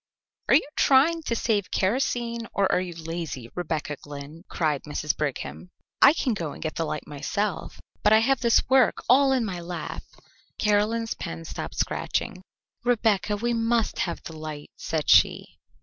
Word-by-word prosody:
"Are - - +7
you 295 - +3
trying 300 +5 +4
to 235 - 0
save 205 -6 0
kerosene 235 +2 -1
or 195 -1 +2
are - - +2
you 180 -2 -6
lazy, 160 -7 -6
Rebecca 155 -4 -3
Glynn?" 145 +4 -10
cried 150 -4 0
Mrs. 150 0 -2
Brigham. 150 +4 -4 0.3
"I 280 - +9
can 265 -6 0
go 165 -8 -4
and - - -11
get 155 - -2
the 165 - -2
light 150 - -4
myself, 185 +8 -3 0.2
but 210 - +4
I 220 - +8
have 255 +4 +2
this 235 -2 +3
work 260 -1 +3
all 270 +2 +5
in 255 -3 +2
my 185 -4 -4
lap." 170 -2 -5 0.6
Caroline's 215 +2 +1
pen 80 0 -7
stopped - - -6
scratching. 185 - -2 0.4
"Rebecca, 215 -4 +2
we 240 +3 -1
must 230 0 0
have 170 - -2
the 165 - -8
light," 155 -1 -7
said 155 -3 -3
she. - - +4
200 Hz, 165 wpm, -26 LUFS, 155-235 Hz, 0.6 s, I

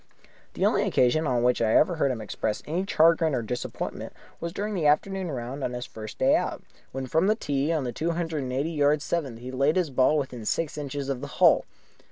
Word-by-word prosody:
The - - +1
only - - +3
occasion 150 +6 +2
on 125 -3 +1
which 125 -1 +2
I 110 -1 +2
ever 170 +2 +4
heard 140 - +2
him 120 -4 -3
express 105 0 -3
any 175 +5 -2
chagrin 165 -3 +4
or 120 - -1
disappointment 125 +3 -5 0.3
was 170 - -4
during 210 +4 -3
the 165 -6 +1
afternoon 185 +5 +1
round 130 0 -5
on 125 - -2
his 125 0 -4
first 110 -1 -9
day - - +4
out, - - -2 0.3
when 135 0 -4
from 160 +8 +1
the 215 - +3
tee 145 -6 -1
on 155 -4 0
the 125 - -3
two 160 +8 -2
hundred 165 -3 -2
and 130 -1 -4
eighty 140 +6 -1
yard 150 -1 +2
seventh 140 -9 -2
he 125 +2 -8
laid 135 +4 +2
his 180 -6 0
ball 130 +4 +3
within 130 -5 -4
six 155 +8 -1
inches 145 -2 -4
of 135 -2 -3
the 145 - -5
hole. - - +5
145 Hz, 230 wpm, -26 LUFS, 125-165 Hz, 0.3 s, hole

